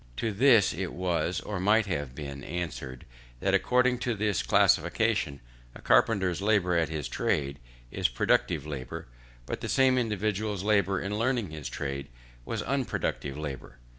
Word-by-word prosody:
To 115 - -1
this 115 -1 +5
it 90 +4 -4
was, 90 -1 -1
or 105 -3 -4
might 105 +4 +3
have 75 -9 -3
been, 70 -2 -7
answered, 70 -7 -5 0.3
that - - 0
according 125 0 +3
to 125 -2 -1
this 105 -2 0
classification, 70 -1 +2 0.3
a - - -10
carpenter's 95 -5 +3
labour 100 -4 +2
at 80 -2 +2
his 75 -3 -3
trade 70 -1 -1 0.3
is - - +1
productive - - +1
labour, 70 -4 -6 0.4
but - - -5
the - - -4
same 130 -1 +4
individual's 105 -3 -1
labour 100 -2 +2
in 105 +2 -3
learning 120 -6 0
his 75 -3 -6
trade 70 -1 -4 0.4
was - - -3
unproductive 125 - -2
labour. 70 -5 -6
95 Hz, 150 wpm, -28 LUFS, 75-110 Hz, 0.4 s, this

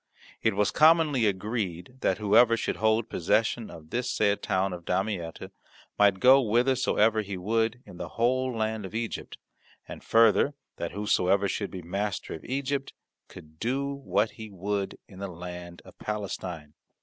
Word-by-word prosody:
It - - +1
was 105 0 +2
commonly 155 -6 +5
agreed 100 0 -3
that 95 - +1
whoever 110 +3 +5
should - - -2
hold 110 +2 +2
possession 110 +5 0
of 80 0 -12
this 125 +1 -1
said 105 -1 +1
town 95 0 0
of 85 -1 -7
Damietta 90 -2 -3 0.5
might 100 -2 +5
go 130 +4 +7
whithersoever 115 -2 +2
he 100 -2 -5
would 115 +5 0
in 90 - -12
the 90 -1 -6
whole 130 +2 +2
land 110 -2 -2
of 95 +3 -8
Egypt, 115 0 -4 0.5
and - - -9
further, 115 +5 +4 0.2
that 85 - -4
whosoever 100 -1 +2
should 100 +1 -2
be 90 -2 -8
master 100 +3 -3
of 80 - -8
Egypt 135 +1 -2 0.3
could 80 0 -14
do 135 +4 -1
what 135 -5 0
he 110 -1 -9
would 100 +1 -3
in 95 -4 -13
the 100 - -4
land 90 -1 -9
of - - -14
Palestine. 95 -7 -5
105 Hz, 160 wpm, -27 LUFS, 95-115 Hz, 0.5 s, go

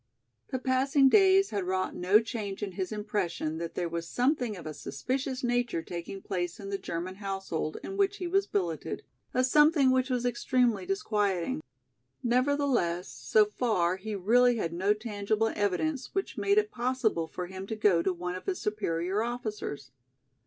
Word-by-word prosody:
The 260 - -1
passing 265 +2 +3
days 390 +2 +5
had 200 -2 -1
wrought 185 +1 -1
no 190 +4 +5
change 215 -3 -4
in 200 - -3
his 185 +2 -4
impression 205 -7 -2
that 170 -1 -5
there 175 - -1
was 170 0 -4
something 245 -4 +1
of 170 - -10
a 155 - -5
suspicious 260 - -3
nature 240 -8 0
taking 175 +3 -6
place 175 -2 -3
in 195 -1 -7
the 195 - -2
German 180 +3 -5
household 195 -6 -3
in 390 - -5
which 400 0 +2
he 365 - -4
was 390 +3 +1
billeted, 175 -6 -2 0.3
a 255 - +2
something 295 0 +5
which 260 +1 +2
was 250 -1 0
extremely 245 - +1
disquieting. 215 - 0 0.6
Nevertheless, 250 -8 +1
so 215 -1 +3
far 205 -5 0
he 210 +2 -5
really 240 +6 +4
had 170 -6 -2
no 195 +4 +2
tangible 215 0 -1
evidence 250 - -1
which 390 - -2
made 405 0 +2
it 425 0 +3
possible 240 -9 0
for 180 - -5
him 190 +1 -7
to 220 - -3
go 205 -6 +3
to 190 - +1
one 180 0 -4
of 185 - -8
his 380 -2 -1
superior 195 -2 -1
officers. 215 - -4
215 Hz, 170 wpm, -29 LUFS, 185-255 Hz, 0.6 s, days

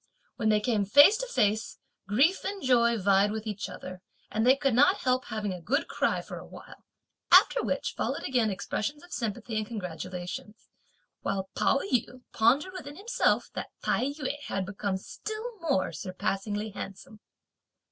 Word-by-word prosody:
When 220 -3 0
they 215 -1 +4
came 210 -1 +1
face 285 - +7
to - - -4
face, 215 - 0 0.3
grief 275 - +3
and 395 -1 -4
joy 235 -2 +4
vied 200 0 +3
with 220 0 -4
each 210 -2 -4
other; 185 0 -9 0.3
and 220 +2 +1
they 260 - +7
could 275 -2 0
not 290 - +4
help 255 0 +1
having 215 -3 -3
a 180 - -8
good 275 - 0
cry - - 0
for - - -8
a - - -11
while; - - -13 0.5
after - - +7
which - - -2
followed - - -2
again 245 -4 +1
expressions 215 - -3
of 350 - -12
sympathy 220 0 -3
and 215 -1 -2
congratulations; 185 0 -6 0.5
while 190 -1 -3
Pao 275 - +2
yü 250 +1 -1
pondered 275 +11 +3
within 290 -6 -8
himself 430 +8 +1
that - - -5
Tai - - +1
yü 285 0 -3
had 195 -1 -2
become 200 0 -2
still 435 - -7
more 280 - 0
surpassingly 195 +5 -3
handsome. 195 +2 -9
220 Hz, 165 wpm, -28 LUFS, 200-285 Hz, 0.5 s, face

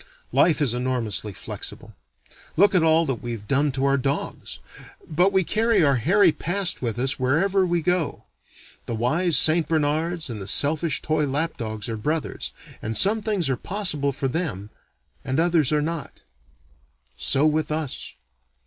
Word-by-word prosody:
Life 155 -3 +3
is 125 -5 +1
enormously 120 -5 -1
flexible - - -7 0.6
look 200 +4 +5
at 180 - +4
all 160 +1 +3
that 135 -5 -3
we've 115 -4 -6
done 140 +1 +2
to 135 +1 -1
our 140 0 +3
dogs, 135 +2 -4 0.5
but 180 +5 +2
we 190 -1 +2
carry 220 0 +2
our 140 -3 +3
hairy 180 - +4
past 180 +3 -1
with 120 -2 -3
us 130 +2 0
wherever 185 +9 +1
we 175 -2 0
go. 180 -3 -1 0.6
The 115 - -3
wise 150 +8 +2
St. 160 +2 +4
Bernards 160 +2 0
and 115 -5 -6
the 95 - -7
selfish 150 - +1
toy 155 -1 0
lap 145 +5 -1
dogs 110 -2 -5
are 115 -1 -4
brothers, 155 +8 -3 0.3
and 110 0 -1
some 215 +3 +5
things 205 -7 0
are 135 - +1
possible 155 - -2
for 135 0 -3
them 125 - -4 0.5
and 130 +3 -1
others 165 -4 +2
are 150 -1 +1
not. 165 -2 -5 0.9
So 140 +2 +3
with 155 0 0
us. 155 -3 -4
150 Hz, 160 wpm, -23 LUFS, 130-170 Hz, 0.9 s, look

